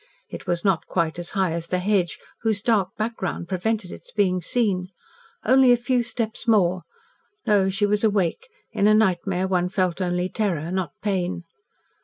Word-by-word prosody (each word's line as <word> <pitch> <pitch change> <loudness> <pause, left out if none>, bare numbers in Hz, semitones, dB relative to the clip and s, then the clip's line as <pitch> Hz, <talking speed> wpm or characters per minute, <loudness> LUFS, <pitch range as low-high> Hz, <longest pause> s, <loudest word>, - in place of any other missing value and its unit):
It - - -9
was 175 +1 -1
not 190 -4 +1
quite 170 -1 -1
as 175 - -4
high 190 -3 +2
as 165 0 -3
the 180 - 0
hedge 180 -2 +1 0.2
whose 220 -3 0
dark 210 -6 +2
background 215 -6 -3
prevented 190 +1 -2
its - - -10
being 185 -4 +1
seen. 190 -2 +1 0.6
Only 260 +2 +6
a 245 - +6
few 245 +1 +1
steps 230 0 -4
more. 185 -5 +3 0.6
No, 200 -2 +3
she 200 +2 +1
was 205 +1 0
awake 205 - +1 0.2
in 200 - +2
a 215 - +6
nightmare 190 -3 +1
one 180 -1 +1
felt 185 -1 0
only 180 0 0
terror, 180 -6 -2
not 185 -5 -2
pain. 185 -4 -1
190 Hz, 170 wpm, -24 LUFS, 180-215 Hz, 0.6 s, Only